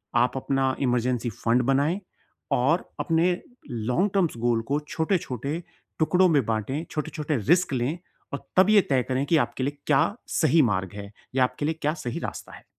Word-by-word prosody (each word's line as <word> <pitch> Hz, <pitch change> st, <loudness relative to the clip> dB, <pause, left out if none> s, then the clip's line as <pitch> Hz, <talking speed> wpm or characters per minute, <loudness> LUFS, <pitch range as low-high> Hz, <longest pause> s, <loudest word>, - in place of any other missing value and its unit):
आप 125 Hz, +2 st, +3 dB
अपना 135 Hz, 0 st, 0 dB
emergency 125 Hz, -1 st, 0 dB
fund 115 Hz, +3 st, +1 dB
बनाएँ। 150 Hz, +8 st, +1 dB, 0.5 s
और 145 Hz, +8 st, +2 dB
अपने 165 Hz, +1 st, +2 dB, 0.4 s
लॉन्ग 125 Hz, -, 0 dB
टर्म्स 180 Hz, -5 st, +2 dB
गोल 115 Hz, -1 st, +1 dB
को 145 Hz, -, +2 dB
छोटे-छोटे 160 Hz, -, -1 dB, 0.4 s
टुकड़ों 180 Hz, +4 st, +4 dB
में 145 Hz, -8 st, +3 dB
बाँटें, 115 Hz, +8 st, -2 dB
छोटे-छोटे 150 Hz, -1 st, -2 dB
रिस्क 170 Hz, -, +2 dB
लें। 130 Hz, +7 st, -1 dB, 0.4 s
और 140 Hz, -, -6 dB
तब 185 Hz, +2 st, +6 dB
ये 215 Hz, -1 st, +7 dB
तय 130 Hz, -3 st, +3 dB
करें 130 Hz, +2 st, -1 dB
कि 160 Hz, +2 st, +3 dB
आपके 130 Hz, -, -6 dB
लिए 145 Hz, +2 st, -2 dB
क्या 145 Hz, -3 st, +5 dB, 0.4 s
सही 160 Hz, 0 st, +5 dB
मार्ग 95 Hz, -1 st, -2 dB
है 100 Hz, 0 st, -8 dB, 0.2 s
या 130 Hz, -, +4 dB
आपके 125 Hz, +3 st, -1 dB
लिए 160 Hz, -, +1 dB
क्या 150 Hz, +1 st, +1 dB
सही 120 Hz, -, -3 dB
रास्ता -, -, -6 dB
है। -, -, -15 dB
140 Hz, 175 wpm, -25 LUFS, 125-160 Hz, 0.5 s, ये